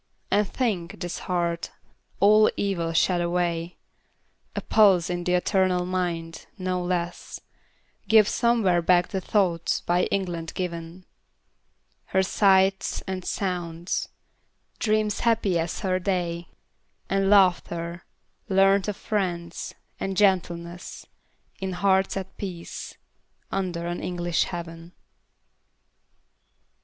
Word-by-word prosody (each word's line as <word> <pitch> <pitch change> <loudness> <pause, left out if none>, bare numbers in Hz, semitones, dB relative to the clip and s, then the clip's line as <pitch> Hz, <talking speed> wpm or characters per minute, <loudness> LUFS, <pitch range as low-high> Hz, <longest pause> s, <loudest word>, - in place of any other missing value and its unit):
And 205 +1 +3
think, 195 -10 -2
this 175 -1 -4
heart, 170 -2 -1 0.5
all 215 +2 +6
evil 175 -5 -1
shed 175 +2 +2
away, 170 0 -1 0.8
A - - -2
pulse 190 -6 +4
in 175 0 -2
the 180 +1 +1
eternal 180 -1 +2
mind, 170 -3 -3
no 185 -1 -2
less 175 -1 -3 0.7
Gives 215 -2 +6
somewhere 225 -8 +2
back 175 +1 +3
the 190 -2 -2
thoughts 180 -4 +1
by 175 +1 +1
England 175 -4 -3
given; 170 0 -5 1.0
Her 190 - +1
sights 190 0 +2
and 190 -1 -4
sounds; 175 -3 -3 0.7
dreams 215 -1 +1
happy 220 -7 +2
as 165 +1 -3
her 185 -1 0
day; 175 -3 -2 0.6
And 195 0 +1
laughter, 175 -3 +2 0.5
learnt 195 0 +4
of 205 -1 -3
friends; 175 -5 -3 0.2
and 195 -1 -3
gentleness, 175 -3 0 0.5
In 190 -1 -3
hearts 190 +1 +2
at 190 -1 -7
peace, 180 -4 -7 0.5
under 180 -3 -2
an 175 0 -3
English 175 -1 0
heaven. 170 0 -7
180 Hz, 105 wpm, -25 LUFS, 170-195 Hz, 1.0 s, all